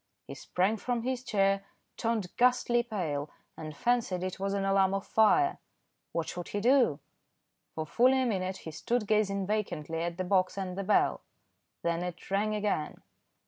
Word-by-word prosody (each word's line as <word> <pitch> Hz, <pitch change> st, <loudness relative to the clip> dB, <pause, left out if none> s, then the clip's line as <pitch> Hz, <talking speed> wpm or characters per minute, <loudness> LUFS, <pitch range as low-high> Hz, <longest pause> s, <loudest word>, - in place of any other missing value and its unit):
He -, -, -8 dB
sprang 190 Hz, +5 st, 0 dB
from 240 Hz, +1 st, -2 dB
his 255 Hz, 0 st, -2 dB
chair, 195 Hz, -4 st, +2 dB, 0.3 s
turned 225 Hz, -6 st, -2 dB
ghastly 245 Hz, -1 st, +3 dB
pale, 165 Hz, -11 st, -3 dB, 0.3 s
and 155 Hz, -2 st, -8 dB
fancied 235 Hz, -7 st, +1 dB
it 185 Hz, 0 st, -4 dB
was 195 Hz, +1 st, -1 dB
an 195 Hz, -1 st, 0 dB
alarm 195 Hz, 0 st, +3 dB
of 195 Hz, -, -3 dB
fire. 355 Hz, -, +3 dB, 0.5 s
What 165 Hz, -1 st, -2 dB
should 175 Hz, -1 st, -5 dB
he 205 Hz, -, -3 dB
do? 240 Hz, -, +4 dB, 0.8 s
For 160 Hz, -, -3 dB
fully 255 Hz, +10 st, +4 dB
a -, -, 0 dB
minute 190 Hz, -4 st, -1 dB
he 160 Hz, -, -8 dB
stood 235 Hz, +8 st, -1 dB
gazing 200 Hz, -2 st, +1 dB
vacantly 185 Hz, -6 st, -2 dB
at 170 Hz, 0 st, -3 dB
the 185 Hz, -, -1 dB
box 185 Hz, 0 st, +1 dB
and 185 Hz, -2 st, -3 dB
the 195 Hz, -, -3 dB
bell. 200 Hz, +2 st, +2 dB, 0.6 s
Then 170 Hz, 0 st, 0 dB
it 180 Hz, +1 st, -6 dB
rang 210 Hz, +2 st, +1 dB
again. 205 Hz, -7 st, -2 dB
195 Hz, 170 wpm, -30 LUFS, 180-225 Hz, 0.8 s, do